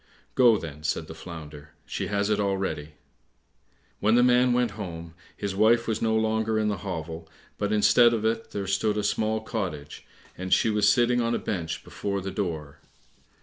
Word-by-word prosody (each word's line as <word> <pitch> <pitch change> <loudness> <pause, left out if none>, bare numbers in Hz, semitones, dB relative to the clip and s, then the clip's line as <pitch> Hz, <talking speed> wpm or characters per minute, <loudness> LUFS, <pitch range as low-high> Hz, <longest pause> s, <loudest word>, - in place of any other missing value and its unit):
"Go, 120 -4 +5
then," 75 -4 -8
said 80 +1 -1
the 80 - -9
Flounder, 75 -3 -10
"she - - -4
has 100 +1 0
it 105 - +1
already." 95 -7 -2 1.1
When 110 +3 +3
the 120 - +5
man 125 0 +4
went 120 -2 +2
home, 85 -5 -7 0.2
his 100 -2 -3
wife 115 +3 +4
was 110 -1 -1
no 110 -1 +2
longer 110 0 +1
in 105 -1 +1
the 105 - -1
hovel, 80 -3 -6 0.3
but 105 0 -1
instead 120 +3 +5
of 110 -2 -1
it 115 0 -1
there 100 -1 -4
stood 100 +2 0
a 105 - 0
small 110 +1 0
cottage, 90 -10 -5 0.3
and 95 0 -6
she 110 - +4
was 105 -1 +3
sitting 120 0 +3
on 115 0 0
a - - +1
bench 85 -5 -4
before 100 -1 -3
the 95 0 -5
door. 80 -8 -4
105 Hz, 185 wpm, -26 LUFS, 85-110 Hz, 1.1 s, Go